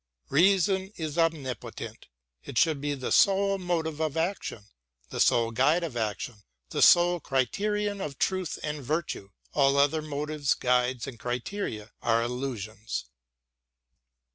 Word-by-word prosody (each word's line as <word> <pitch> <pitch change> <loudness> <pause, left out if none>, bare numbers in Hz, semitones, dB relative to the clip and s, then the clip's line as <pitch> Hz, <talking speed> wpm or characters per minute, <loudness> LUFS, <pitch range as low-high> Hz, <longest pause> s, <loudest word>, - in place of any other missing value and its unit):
Reason 190 +3 +3
is 160 0 -3
omnipotent: 155 -6 -2 0.4
it - - -7
should 155 +2 +3
be 145 0 -1
the 130 -2 -4
sole 195 0 +4
motive 165 -4 -2
of 155 -1 -1
action, 165 - -2 0.5
the - - -4
sole 115 -1 +4
guide 145 +9 +3
of 155 -7 -4
action; 110 0 -3 0.3
the - - -2
sole 175 0 +6
criterion 205 - -1
of 140 -5 -5
truth 185 -4 -1
and 150 -1 -3
virtue: 155 -8 -2 0.2
all 140 -1 +3
other 145 +3 +3
motives, 150 -1 -1
guides, 125 -1 +1
and 130 -5 -8
criteria 120 - -4
are 115 0 +2
illusions. 115 -3 -4
145 Hz, 130 wpm, -28 LUFS, 125-175 Hz, 0.5 s, sole